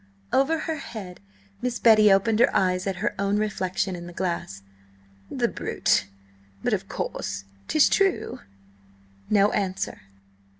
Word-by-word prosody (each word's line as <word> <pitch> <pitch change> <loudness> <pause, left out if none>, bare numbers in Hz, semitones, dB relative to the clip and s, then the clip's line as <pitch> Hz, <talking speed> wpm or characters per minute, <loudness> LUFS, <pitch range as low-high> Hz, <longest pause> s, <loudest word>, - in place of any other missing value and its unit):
Over 285 +5 +3
her 320 -1 -3
head 205 -10 -8 0.4
Miss 250 -1 -1
Betty 215 -3 +6
opened 215 +3 +3
her 245 - +6
eyes 185 0 +1
at 195 - -1
her - - 0
own 200 +1 +1
reflection 190 -3 -1
in 175 0 -8
the 175 - -10
glass. 170 - -3 0.7
"The - - 0
brute! - - 0 0.6
But, - - +1
of - - -2
course, 100 0 -4 0.2
'tis 310 - +5
true?" 390 -2 +1 0.9
No 205 0 +4
answer. 190 -1 -2
200 Hz, 135 wpm, -25 LUFS, 185-230 Hz, 0.9 s, Betty